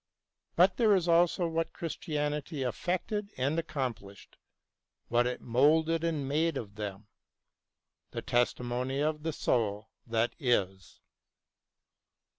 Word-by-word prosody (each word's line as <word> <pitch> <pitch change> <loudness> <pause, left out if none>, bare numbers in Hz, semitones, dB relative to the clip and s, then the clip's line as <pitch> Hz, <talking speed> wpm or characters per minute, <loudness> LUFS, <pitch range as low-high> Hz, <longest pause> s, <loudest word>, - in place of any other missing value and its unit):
But 180 +2 +4
there 220 -4 +5
is 180 -2 0
also 170 +1 +3
what 165 0 -2
Christianity 150 -2 -3
effected 185 - -2
and 140 +5 +1
accomplished, 130 - -5 0.7
what 120 +1 +3
it 125 - -3
moulded 155 +7 +3
and 155 -5 -1
made 155 +2 +1
of 105 -5 -6
them 105 -1 -6 0.5
— - - -60 0.2
the - - -5
testimony 125 +1 0
of 150 +1 0
the 160 +1 -2
soul 110 -6 -1 0.2
that 115 +1 +1
is. 95 - -1
140 Hz, 115 wpm, -30 LUFS, 120-165 Hz, 0.7 s, there